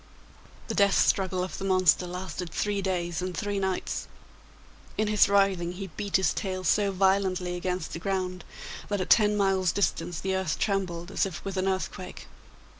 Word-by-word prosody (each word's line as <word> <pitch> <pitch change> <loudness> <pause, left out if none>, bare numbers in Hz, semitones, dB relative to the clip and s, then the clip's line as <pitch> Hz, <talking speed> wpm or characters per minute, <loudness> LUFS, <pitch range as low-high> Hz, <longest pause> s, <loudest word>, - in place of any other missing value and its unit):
The - - -2
death 200 -2 +4
struggle 185 -1 +2
of 185 - -5
the - - -5
monster 185 -3 +3
lasted 180 0 -5
three 205 +4 -1
days 175 -3 -2
and 180 -2 -4
three 205 +4 -1
nights; 190 -1 -2 0.9
in 215 - +2
his 210 -2 +4
writhing 195 -3 +2
he 190 -1 -7
beat 205 -2 -3
his 190 -5 +3
tail 185 -2 -3
so 200 +3 +2
violently 190 -2 +1
against 180 -1 -3
the - - -4
ground, 185 -1 -2 0.5
that 205 -1 0
at 185 - -2
ten 210 -2 +5
miles' 190 -3 +2
distance 175 -4 -1
the 190 +3 -1
earth 190 -4 -1
trembled 185 -3 -1
as 195 - +1
if 185 0 -8
with 195 -1 -4
an 190 0 0
earthquake. 190 -1 -3
190 Hz, 175 wpm, -27 LUFS, 180-195 Hz, 0.9 s, ten